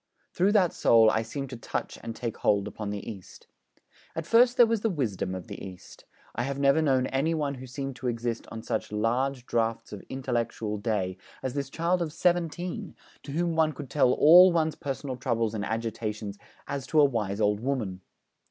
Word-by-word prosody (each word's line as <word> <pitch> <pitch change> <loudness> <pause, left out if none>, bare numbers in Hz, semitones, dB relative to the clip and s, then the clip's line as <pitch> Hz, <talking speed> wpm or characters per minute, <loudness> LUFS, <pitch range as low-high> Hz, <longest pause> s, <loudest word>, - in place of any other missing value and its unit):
Through 195 +4 +2
that 185 -5 +4
soul 115 -1 +5
I 110 - +1
seemed 135 +4 -5
to 125 - -6
touch - - -4
and 115 - -6
take 115 -2 -4
hold 100 -1 +2
upon 105 0 -5
the 100 -1 -5
East. 100 -5 -10 0.7
And 165 - -3
first 240 +5 +5
there 240 - +8
was 225 -2 0
the 225 - +1
wisdom 105 - -2
of 90 -3 -7
the - - -8
East. 95 -2 -11 0.3
I - - -2
have 135 +2 -2
never 140 +3 +4
known 135 -4 +2
any 140 +6 0
one 145 -3 -1
who 130 -1 -9
seemed 135 +1 -5
to 130 - -4
exist 115 -1 -2
on 110 -1 -7
such 110 -3 -3
'large 125 +4 0
draughts 115 -2 -1
of 100 - -7
intellectual 120 -5 -2
day' 100 -4 -1 0.3
as 130 -2 -2
this 140 -1 -3
child 170 +4 0
of 165 -3 -2
seventeen, 175 0 -1 0.3
to 140 - -8
whom 170 +1 0
one 160 -1 +3
could 140 -1 -9
tell 135 -4 +4
all 180 +5 +8
one's 160 -2 +1
personal 135 -2 -5
troubles 115 -4 0
and 105 -2 -3
agitations, 110 -2 -4 0.3
as 140 -1 -4
to 155 - +3
a 145 - +8
wise 105 -7 -1
old 105 -1 +2
woman. 110 -7 -2
130 Hz, 200 wpm, -28 LUFS, 110-155 Hz, 0.7 s, there